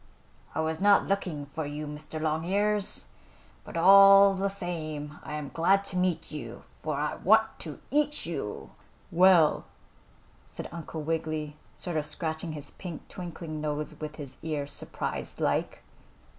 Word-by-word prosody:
"I 160 - +1
was 160 +2 -2
not 200 0 +5
looking 180 -7 -2
for 155 +3 -5
you, 150 +1 -5
Mr. 150 +1 -6
Longears, 190 +7 0 0.6
but - - -7
all 195 +2 +8
the 195 +1 0
same 155 -6 -5
I 150 - -6
am 145 -3 -5
glad 195 +4 +3
to 185 - -6
meet 180 -2 0
you, 120 -6 -7 0.2
for 155 -2 -2
I 150 +1 -1
want 220 +3 +3
to 155 -4 -7
eat 295 +1 +1
you." - - -5 0.4
"Well," 175 -3 +5 0.8
said - - -7
Uncle 160 -1 -6
Wiggily, 155 -1 -2 0.2
sort 175 -3 -3
of 150 - 0
scratching 160 +1 -3
his 145 -1 -6
pink, 175 -4 -8
twinkling 165 -3 -6
nose 150 0 -3
with 155 -1 -5
his 145 -4 -8
ear, 150 -3 -2
surprised 145 - -5
like. - - 0
160 Hz, 145 wpm, -28 LUFS, 150-190 Hz, 0.8 s, all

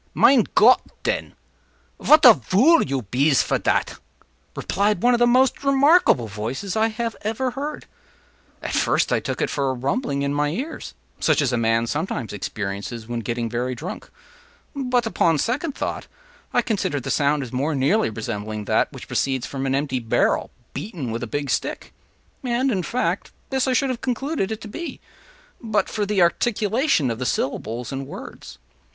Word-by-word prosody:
” - - -38
“Mein 255 -6 +5
Gott, 245 +4 +7 0.2
den, - - -2 0.6
vat 305 +1 +6
a - - +11
vool 240 - +4
you 135 -3 -2
bees 135 +7 +2
for - - 0
dat!” - - 0 0.6
replied 200 -1 0
one 245 +1 +5
of 240 - +2
the 240 - +5
most 255 +2 +3
remarkable 275 - +4
voices 115 - -4
I 220 0 +1 0.3
ever 225 +5 -1
heard. 290 +4 -5 0.8
At - - -4
first - - +2
I - - +3
took - - -4
it - - -1
for 140 -2 0
a 130 - -1
rumbling 140 - -1
in 140 0 -1
my 145 0 +1
ears—such 265 - -3
as 135 -4 +1
a - - +3
man 115 0 +2
sometimes 135 - -3
experiences 105 +2 -5
when 120 0 -3
getting 115 +1 -2
very 125 +2 -2
drunk—but, 250 - -5
upon 165 -7 +2
second 270 - -1
thought, - - -4 0.4
I - - +2
considered 185 - -1
the - - -3
sound 145 0 +2
as 125 - -9
more 145 +5 0
nearly 140 - +2
resembling 105 -1 -5
that - - +1
which - - -10
proceeds 130 -2 -1
from 135 -1 -4
an 135 - +1
empty 135 -2 -1
barrel 115 -2 +1 0.2
beaten 165 - -5
with 115 - -3
a 125 - -4
big 140 +2 -3
stick; - - -3 0.5
and, 255 +1 +1
in 190 -5 0
fact, 245 +7 -2 0.2
this 265 0 +1
I 260 - +2
should 260 +2 +1
have 245 - -5
concluded 260 -3 -2
it 220 - -4
to - - -8
be, 330 +11 -6 0.6
but 225 -2 0
for 210 -2 -2
the 200 -3 +3
articulation 215 - +1
of 115 - -5
the 130 - -2
syllables 115 +1 -2
and 135 0 -5
words. 65 - -10
155 Hz, 175 wpm, -23 LUFS, -, 0.8 s, a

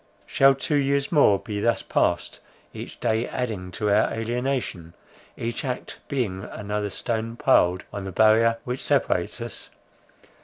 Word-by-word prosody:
Shall 135 0 +5
two 145 +2 0
years 140 0 +1
more 140 - +5
be 105 +1 -5
thus 115 +3 +1
passed, 85 0 0 0.3
each - - -8
day 110 +2 0
adding 110 -8 -3
to 105 +2 0
our 105 +2 +3
alienation, 115 -7 -3 0.4
each 115 0 -3
act 125 -2 -5
being 105 -9 -2
another 105 0 -3
stone 115 +2 -3
piled 90 -8 +3
on 100 -1 -5
the 95 - -5
barrier 110 +3 +4
which 125 +1 -4
separates - - +1
us? - - -6
115 Hz, 145 wpm, -25 LUFS, 100-125 Hz, 0.4 s, Shall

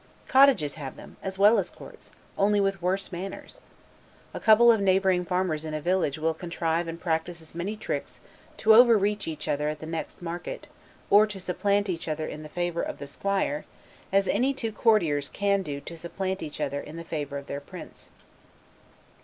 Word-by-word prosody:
Cottages 260 - +5
have 135 -2 -6
them, - - -13
as 190 0 -5
well 210 +3 +6
as 190 - -2
courts; - - -13 0.3
only 205 +1 +3
with 195 -1 0
worse 190 +3 -1
manners. 195 - -7 0.7
A - - -5
couple 230 +2 +7
of 220 -3 +2
neighboring 190 -1 +3
farmers 180 -4 -1
in 155 -1 -4
a - - -2
village 175 -3 0
will 160 +1 0
contrive 170 0 -2
and 165 0 -6
practice 170 0 -2
as 160 -1 -10
many 185 +6 -4
tricks, - - -4 0.4
to 220 0 +5
over 235 0 +8
reach 205 0 -1
each 155 -1 -4
other 150 +1 0
at 155 - -4
the 155 - -9
next 165 0 -5
market, 175 0 -6 0.4
or 210 +1 +7
to 205 -2 -7
supplant 200 +3 0
each 170 -3 -4
other 155 0 -2
in 155 - -6
the 155 - -9
favor, 175 +1 -2
of - - -4
the 140 - -7
squire, 190 0 -1 0.5
as 195 0 +3
any 260 +6 +1
two 230 -4 -3
courtiers 170 - +2
can 200 -1 +1
do 145 -6 -5
to 170 - -9
supplant 190 +3 -4
each 150 - -6
other 140 -1 -1
in 150 - -10
the 170 - -6
favor 145 -4 -4
of 140 - -7
their 140 - -5
prince. - - -11
180 Hz, 195 wpm, -27 LUFS, 155-200 Hz, 0.7 s, over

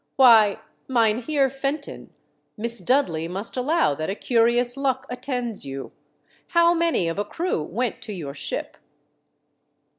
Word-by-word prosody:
" - - -49
Why, 225 -6 +6 0.3
Mynheer 250 +4 +1
Fenton, 275 +2 -5 0.5
Miss 235 +2 +2
Dudley 205 - +1
must 195 +5 -4
allow 275 - +1
that 155 +4 -4
a 195 - -2
curious 240 +2 +3
luck 265 -1 -1
attends 245 -4 -3
you. 135 0 -6 0.6
How 340 0 +4
many 335 - +1
of 165 +4 -3
a - - +1
crew 330 - -3
went 230 +10 -3
to - - -8
your 155 -8 -6
ship 145 - -5
240 Hz, 140 wpm, -23 LUFS, 200-275 Hz, 0.6 s, Why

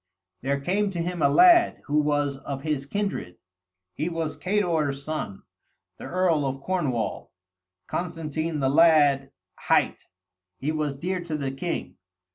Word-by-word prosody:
There 140 +2 0
came 195 +8 0
to 180 -3 -5
him 175 0 -2
a 140 - +5
lad, 350 - +6
who 150 +1 +2
was 145 -2 0
of 135 0 -6
his 150 -3 -2
kindred; 195 - -3 0.6
he 155 - -2
was 165 -2 -3
Cador's 165 -8 0
son, 155 -11 -5 0.6
the - - -8
earl 175 -5 +1
of 135 +1 -4
Cornwall; 140 - -2 0.5
Constantine 160 -2 -3
the 135 - +2
lad 145 -3 +5 0.3
hight, - - +1 0.5
he 145 +8 -2
was 150 -3 -2
dear 180 +5 -2
to 155 -3 -2
the 135 -2 -2
king. 165 +6 -4
155 Hz, 140 wpm, -26 LUFS, 140-175 Hz, 0.6 s, lad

